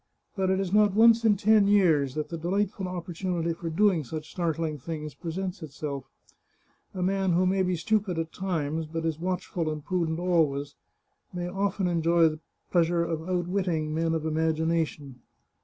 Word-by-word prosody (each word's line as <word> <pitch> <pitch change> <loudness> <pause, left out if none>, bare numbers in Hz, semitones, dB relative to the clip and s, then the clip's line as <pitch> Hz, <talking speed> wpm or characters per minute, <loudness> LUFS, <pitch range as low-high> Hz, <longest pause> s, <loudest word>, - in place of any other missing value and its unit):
But 190 -2 0
it 190 0 +2
is 190 -1 -2
not 210 -2 +4
once 230 +1 +6
in 215 -3 +4
ten 210 0 +4
years 160 -10 +3
that 155 -1 -3
the 170 - -4
delightful 195 +3 -1
opportunity 175 -1 -3
for 165 0 -5
doing 180 -1 +2
such 155 +3 -7
startling 165 -3 -2
things 150 +1 -6
presents 180 +3 -5
itself. 140 -3 -5 0.9
A 180 - -2
man 190 -1 +1
who 180 +2 +3
may 190 +1 +2
be 185 -1 +1
stupid 205 0 0
at 165 0 -3
times, 160 -4 -2
but 165 +1 -4
is 160 -1 -1
watchful 180 -2 -2
and 150 -1 -5
prudent 170 -3 -1
always, 160 -6 +1 0.6
may 175 0 -4
often 195 +1 -1
enjoy 170 -1 +3
the 155 0 -7 0.3
pleasure 170 -1 +3
of 165 +1 -4
outwitting 175 -3 -1
men 165 +1 0
of 160 - -2
imagina 160 +1 +1
tion. 140 -4 -12
170 Hz, 170 wpm, -27 LUFS, 160-185 Hz, 0.9 s, once